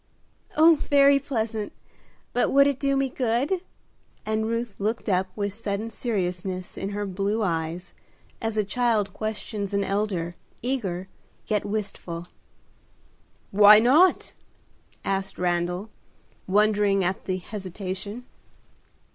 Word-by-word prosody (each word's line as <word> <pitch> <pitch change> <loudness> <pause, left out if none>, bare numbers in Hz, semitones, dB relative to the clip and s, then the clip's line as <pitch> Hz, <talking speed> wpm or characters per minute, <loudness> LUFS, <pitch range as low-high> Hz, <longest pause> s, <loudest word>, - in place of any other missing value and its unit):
"Oh, 320 +1 +7
very 280 -1 +5
pleasant! 225 -6 -3 0.6
but 245 - +2
would 280 0 +6
it 280 -2 +1
do 275 -1 +1
me 275 0 +2
good?" 260 +7 0 0.6
and 220 0 0
Ruth 230 -1 -2
looked 220 +4 -2
up 190 -1 +2
with 205 -2 -2
sudden 210 +1 -3
seriousness 185 -5 -3
in 195 - -4
her 205 0 -3
blue 200 +3 -1
eyes, 165 -1 -2 0.5
as 225 -1 -2
a 215 - +3
child 215 -2 0
questions 210 -2 -4
an 200 - +2
elder, 195 -4 -1 0.3
eager, 195 -8 -2 0.4
yet 210 -2 0
wistful. 195 -5 -4 1.3
"Why 210 +1 +9
not?" 285 +12 +4 0.7
asked 195 0 -2
Randal, 175 +3 -1 0.6
wondering 205 0 +3
at 185 +2 -2
the 185 -1 -1
hesitation. 195 +3 -6
210 Hz, 115 wpm, -25 LUFS, 190-230 Hz, 1.3 s, Why